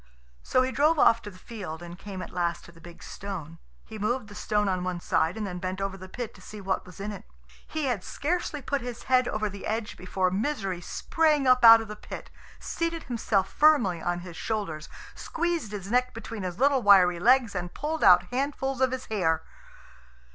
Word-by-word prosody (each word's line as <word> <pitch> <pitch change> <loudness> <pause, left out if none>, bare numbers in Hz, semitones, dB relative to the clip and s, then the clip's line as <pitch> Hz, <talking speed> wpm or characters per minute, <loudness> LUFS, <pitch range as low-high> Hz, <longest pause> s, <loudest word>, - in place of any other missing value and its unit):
So 255 - +2
he 260 - -1
drove 305 +5 +3
off 230 -4 +5
to 205 - -8
the 185 - -14
field, 185 -6 -7
and 175 0 -8
came 190 0 -7
at - - -9
last 170 -1 -1
to - - -13
the 165 -1 -18
big 170 0 -12
stone. 165 -5 -7 0.3
He 220 -1 -9
moved 220 +2 -1
the - - -10
stone 210 0 0
on 185 -2 0
one 180 -1 -2
side, 170 +2 0
and 215 - -2
then 180 -2 -5
bent 185 +1 -4
over 195 0 -2
the 185 0 -10
pit 235 +2 -5
to 185 - -16
see 210 +3 -10
what 190 -2 -2
was 180 - -13
in 205 +2 -4
it. 205 - -8 0.4
He 310 -2 -2
had 240 -8 -1
scarcely 300 -2 -2
put 280 +1 -1
his 240 -1 -7
head 255 -1 +3
over 215 0 -1
the 200 -1 -7
edge 220 0 -2
before 185 0 -1
Misery 195 -4 -2
sprang 305 - +1
up 255 -1 +5
out 230 0 +10
of 225 - -7
the 210 - -7
pit, - - -9 0.3
seated 335 0 -3
himself 215 -5 -1
firmly 240 - +4
on 175 +1 -2
his 175 -2 -9
shoulders, 165 -7 -4 0.2
squeezed 335 -9 -2
his 200 -1 -6
neck 250 0 +1
between 230 -1 -6
his 180 -2 -4
little 275 +1 +3
wiry 185 -5 +6
legs, 240 +2 +4
and 180 -2 -5
pulled 310 +2 -2
out 180 0 +8
handfuls 270 0 -2
of 260 - +4
his 260 0 -4
hair. 160 -7 0
210 Hz, 210 wpm, -27 LUFS, 185-255 Hz, 0.4 s, out